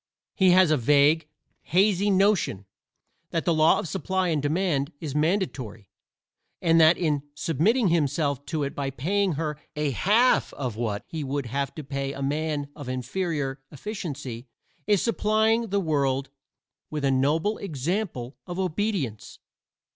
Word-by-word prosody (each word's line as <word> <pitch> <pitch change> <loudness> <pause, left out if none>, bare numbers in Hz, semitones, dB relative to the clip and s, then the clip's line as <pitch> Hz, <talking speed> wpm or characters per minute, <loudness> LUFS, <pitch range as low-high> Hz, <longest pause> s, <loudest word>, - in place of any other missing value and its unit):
He 190 -1 +4
has 180 -2 +6
a 155 - +4
vague, 145 +5 +3 0.3
hazy 195 +2 +2
notion 195 - +2 0.6
that 165 - -2
the 170 - +3
law 155 0 +5
of - - -3
supply 190 +2 -1
and 155 -3 0
demand 150 -1 0
is 150 -5 -5
mandatory, 150 - -1 0.7
and 165 -1 +4
that 160 +2 +6
in 150 -5 0
submitting 185 - +2
himself 145 -3 0
to 150 +1 -1
it 140 - -3
by 140 -1 -2
paying 185 +8 0
her 150 0 -3 0.2
a 150 -1 0
half 215 - +3
of 125 -6 -4
what 110 -3 -2
he 160 -2 -5
would 140 0 -2
have 140 +4 -3
to 155 - -6
pay 140 0 -3
a 140 - -7
man 145 0 -1
of 145 -4 -8
inferior 135 +1 -2
efficiency 145 - -6 0.4
he 210 - +4
is 200 - +2
supplying 220 0 +2
the 200 0 0
world 140 -5 0 0.6
with 150 -2 -3
a 135 - +3
noble 155 +11 +1
example 160 - -3
of 175 0 -5
obedience. 180 - -2
155 Hz, 150 wpm, -26 LUFS, 140-185 Hz, 0.7 s, has